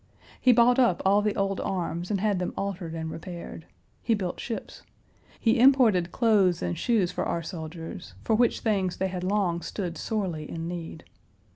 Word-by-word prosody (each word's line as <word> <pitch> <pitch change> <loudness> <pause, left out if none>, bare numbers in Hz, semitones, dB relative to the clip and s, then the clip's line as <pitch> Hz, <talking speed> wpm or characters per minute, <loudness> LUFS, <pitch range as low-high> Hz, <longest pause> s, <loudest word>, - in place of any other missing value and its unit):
He 255 - +6
bought 245 +2 +5
up 235 -9 +3
all 200 +2 +5
the 210 0 0
old 195 -1 0
arms 175 -2 -3
and 205 -2 0
had 205 -2 +1
them 180 - -3
altered 185 -4 -4
and 160 -1 -4
repaired. 170 -1 -8 0.3
He 230 - +2
built 185 -4 -4
ships. 230 - -6 0.6
He 230 +1 +2
imported 235 -10 +5
clothes 205 -7 +3
and 85 -1 -1
shoes 210 -7 +1
for - - -2
our 170 - -2
soldiers, 165 - -7
for - - +1
which 235 +1 +2
things 195 -5 0
they 190 - 0
had 180 -1 -4
long 185 -3 0
stood 175 -3 -5
sorely 180 -9 -3
in 165 0 -5
need. 170 -2 -6
185 Hz, 175 wpm, -27 LUFS, 170-215 Hz, 0.6 s, He